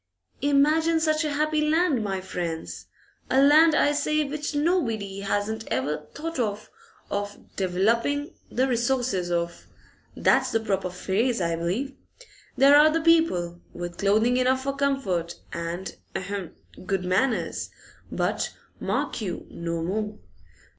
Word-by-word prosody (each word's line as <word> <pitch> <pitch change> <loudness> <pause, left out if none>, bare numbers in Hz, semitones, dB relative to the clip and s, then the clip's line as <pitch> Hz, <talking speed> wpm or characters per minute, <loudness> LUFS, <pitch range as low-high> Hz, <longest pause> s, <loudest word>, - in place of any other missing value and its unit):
'Imagine 305 +4 +3
such 310 0 +1
a 300 -2 -1
happy 305 +1 +1
land, 305 -5 +2
my 195 -2 -2
friends; 160 - -5 0.4
a 265 - +3
land, 305 +3 +6
I 290 - +4
say, 305 +1 +1
which 295 +1 -4
nobody 230 - 0
hasn't 205 +2 -2
ever 145 +4 -2
thought 330 -1 -4
of 215 -2 -2 0.8
"developing 230 +10 +1 0.2
the 260 +2 +1
resources" 240 -6 0
of, 170 0 -2 0.5
that's 265 0 +3
the 225 - +2
proper 195 -4 -1
phrase, 200 +7 0
I 170 -2 0
believe. 190 +12 -2 0.6
There 275 +2 +7
are 300 +1 +8
the 325 +1 0
people, 185 - +2
with 175 0 -6
clothing 220 +5 +3
enough 260 +1 +2
for 275 0 -2
comfort 245 -12 -1 0.2
and 170 +3 -4 0.2
ahem! 190 -2 -4 0.3
good 185 -1 -1
manners, 220 +7 0 0.4
but, - - -1 0.2
mark - - -2
you, 185 -5 -4
no 170 -1 -3
more. 210 +4 -2
225 Hz, 130 wpm, -26 LUFS, 185-285 Hz, 0.8 s, are